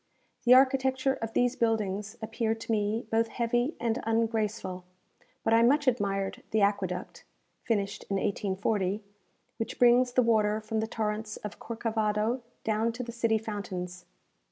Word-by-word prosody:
The 250 +1 +8
architecture 265 0 +3
of 225 0 -4
these 245 +1 +2
buildings 215 -2 -1
appeared 225 0 -1
to 230 - -4
me 215 +1 0
both 225 +1 +2
heavy 240 +5 0
and 235 +1 0
ungraceful; 220 -4 -1 0.6
but 225 - +2
I 230 - +6
much 285 +5 +4
admired 195 -5 0
the 220 - +1
aqueduct 190 -3 -1 0.4
(finished 200 -3 -1
in 200 - 0
1840), 195 +1 -1 0.5
which 225 - -4
brings 245 0 +5
the 250 - +4
water 215 -2 +2
from 220 0 -3
the 220 - -1
torrents 215 -1 -3
of 210 - -8
Corcavado 225 +1 -1 0.2
down 220 +1 +1
to 250 +2 -5
the 235 - -6
city 230 -1 +1
fountains. 185 -4 -5
225 Hz, 145 wpm, -29 LUFS, 210-235 Hz, 0.6 s, The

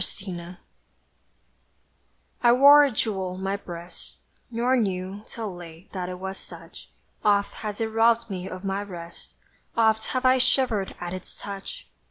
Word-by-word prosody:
SORROW 180 -2 -7 1.9
I 240 - +6
wore 285 +3 +9
a 285 - +3
jewel 190 -5 -1
on 190 - -7
my 195 +1 0
breast, 175 -3 -9 0.3
Nor 245 +2 +2
knew, 195 -3 -1
till 220 -4 -5
late, 175 +1 -11
that 180 -2 -3
it 180 - -5
was 190 +1 -5
such; - - -11 0.3
Oft 205 -1 +3
hath 210 -2 -5
it 225 - +1
robbed 230 +1 +3
me 190 -3 -5
of 185 +1 -7
my 195 +1 -1
rest; 170 -4 -9 0.4
Oft 220 -1 +3
have 255 0 -1
I 255 0 +6
shivered 250 -6 +2
at 175 0 -4
its 185 -1 -7
touch! 200 - -7
200 Hz, 155 wpm, -26 LUFS, 185-230 Hz, 1.9 s, wore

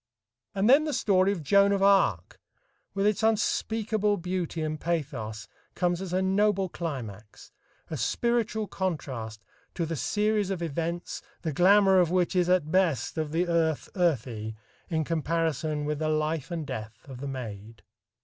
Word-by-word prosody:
And 195 +2 +2
then 280 +5 +6
the 300 - -2
story 195 -2 +3
of 180 -6 -4
Joan 200 +6 +4
of 195 -1 +1
Arc, 195 - +3 0.6
with 195 0 +1
its 210 +1 +2
unspeakable 220 -1 +1
beauty 175 -2 -3
and 155 0 -3
pathos, 135 -11 -3 0.3
comes 175 0 0
as 190 -2 -5
a 185 +1 +1
noble 195 0 +2
climax, 115 - -7 0.4
a 155 - -2
spiritual 225 - 0
contrast, 130 - -4 0.3
to 170 - -1
the 165 +1 -3
series 210 - 0
of 185 -3 -2
events 170 +2 -3 0.2
the 160 -3 -2
glamour 190 +3 +5
of 175 -3 +3
which 180 0 +1
is 180 -1 +2
at 175 -4 +2
best 170 -4 +1
of 155 -2 -2
the 170 +3 0
earth 165 -3 0
earthy 120 - -1 0.3
in 160 -2 0
comparison 155 -2 -1
with 150 0 -2
the 155 -1 0
life 155 0 -1
and 165 -3 -4
death 110 -2 -7
of 130 -3 -9
the 140 - -4
Maid. 115 -4 -7
170 Hz, 160 wpm, -27 LUFS, 145-195 Hz, 0.6 s, then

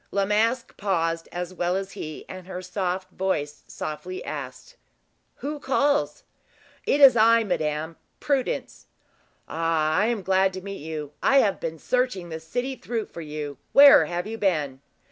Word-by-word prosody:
La 200 -1 0
Masque 225 +4 0
paused 165 -4 -1
as 175 +1 -5
well 175 0 0
as 195 0 -3
he, 155 0 -7
and 185 -1 -9
her 185 -1 -5
soft 185 0 -3
voice 150 -7 -2
softly 370 - -6
asked: - - -7 0.6
"Who 295 +1 -5
calls?" 285 - +1 0.6
"It 285 - +3
is 270 -4 +9
I, 230 +1 +5
madame 160 -4 -2 0.2
Prudence." 280 - -2 0.6
"Ah! 160 -1 0
I 210 - +3
am 230 -4 -1
glad 190 0 +2
to 185 - -6
meet 195 -2 -7
you. 155 -2 -5
I 275 - +4
have 200 - 0
been 165 0 -4
searching 250 -4 -1
the 160 -1 -5
city 245 +11 -3
through 230 -4 -4
for 170 - -8
you. 150 -2 -6
Where 280 0 +9
have 175 +1 -3
you 225 +1 -6
been?" 150 -9 0
190 Hz, 160 wpm, -25 LUFS, 165-230 Hz, 0.6 s, is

